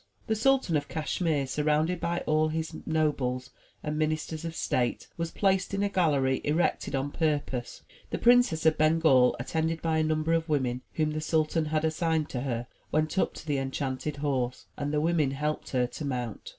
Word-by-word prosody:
The 220 - 0
Sultan 260 -6 +2
of 145 -1 0
Cashmere, 155 -2 -1
surrounded 150 +5 +1
by 170 +1 -1
all 155 0 +2
his 160 +1 -3
nobles 140 -5 0 0.3
and 150 0 -2
ministers 155 +1 -1
of 165 -1 -5
state, 125 -5 -1
was 170 0 -2
placed 195 +1 +1
in 200 - 0
a 205 - +1
gallery 145 -8 +2
erected 150 -2 0
on 135 +1 -1
purpose. 145 -6 -2 0.3
The - - -2
Princess 240 -10 +4
of 160 -1 +4
Bengal, 155 -5 +4
attended 160 +6 -1
by 160 -1 0
a - - +3
number 155 +1 +1
of 165 0 0
women 130 -4 0
whom 155 -1 0
the 155 0 -3
sultan 155 0 +1
had 155 +1 0
assigned 160 -1 0
to 125 - -3
her, 120 -3 -2 0.3
went 155 +4 +1
up - - +1
to - - -9
the 145 -3 0
enchanted 135 +2 -3
horse, 135 -4 -2
and 145 0 -3
the 150 - +1
women 160 -3 +2
helped 150 +3 -3
her 125 -2 +1
to 125 +5 -7
mount. 125 -6 -4
155 Hz, 185 wpm, -28 LUFS, 140-160 Hz, 0.3 s, Princess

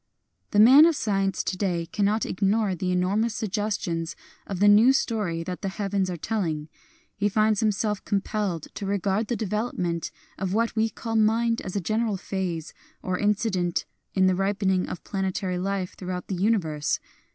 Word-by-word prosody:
The 205 - +2
man 265 +9 +9
of 335 - +2
science 195 -5 0
to - - -2
day 180 -3 -1
cannot 205 +5 0
ignore 200 +1 +1
the 180 +1 -2
enormous 200 +5 +1
suggestions 200 -6 -2 0.3
of 195 - -4
the 205 - +5
new 215 +6 +7
story 205 -10 -1
that 180 +1 -5
the 195 - -2
heavens 195 -1 -1
are 175 - -3
telling. 160 -6 -2 0.5
He 205 0 +1
finds 215 0 +2
himself 210 -1 0
compelled 200 -4 -1
to 200 - -5
regard 200 +2 0
the 240 - -1
development 195 -6 -2 0.3
of 190 0 -1
what 230 +1 +1
we 220 0 +2
call 225 0 -5
mind 230 +1 +2
as 185 - -6
a - - +2
general 215 +3 0
phase 180 -4 -4 0.3
or 185 -1 -2
incident 200 -4 0 0.3
in 190 -1 +4
the 185 - +4
ripening 195 -1 0
of - - -6
planetary 190 -2 -2
life 190 -1 -2
throughout 180 -1 -5
the 190 - -1
universe. 175 -7 0
195 Hz, 165 wpm, -26 LUFS, 180-215 Hz, 0.5 s, man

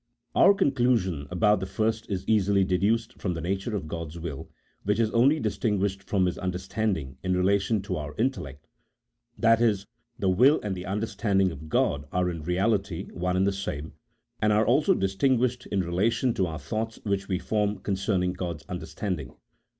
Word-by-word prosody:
Our 200 - +6
conclusion 120 - +1
about 105 +3 +3
the 95 - -4
first 110 +2 -1
is 95 -3 -3
easily 100 -2 +3
deduced 110 +6 0
from 90 -3 -1
the - - -4
nature 95 +6 -2
of 90 -7 -4
God's 80 0 -6
will, 80 -5 -6 0.3
which 105 +2 0
is 110 -1 +2
only 135 +7 +4
distinguished 100 -4 -1
from 95 -1 +1
His 90 - -2
understanding 90 -6 -2
in 90 0 0
relation 100 +2 +2
to 95 -2 -3
our 75 -1 -6
intellect 110 - -2 0.4
— - - -49
that 115 0 +5
is, 105 -4 +2 0.3
the 100 - -1
will 125 +11 +5
and 105 -2 -2
the 90 +1 -7
understanding 100 -2 0
of 80 +1 -9
God 70 -2 +1
are 90 0 +1
in 85 -2 -6
reality 95 +2 0
one 90 +1 -1
and 95 - +3
the 100 - +2
same, 80 -6 -5 0.5
and 105 - +3
are 105 +1 +3
only 155 - +4
distinguished 125 +5 +1
in 100 - 0
relation 105 +8 +1
to 95 -4 0
our 80 -2 -5
thoughts 110 +11 -4
which 100 -2 -1
we 95 - 0
form 105 +1 0
concerning 95 -2 0
God's 85 -4 -5
understanding. 90 +1 -4
95 Hz, 175 wpm, -27 LUFS, 90-110 Hz, 0.5 s, Our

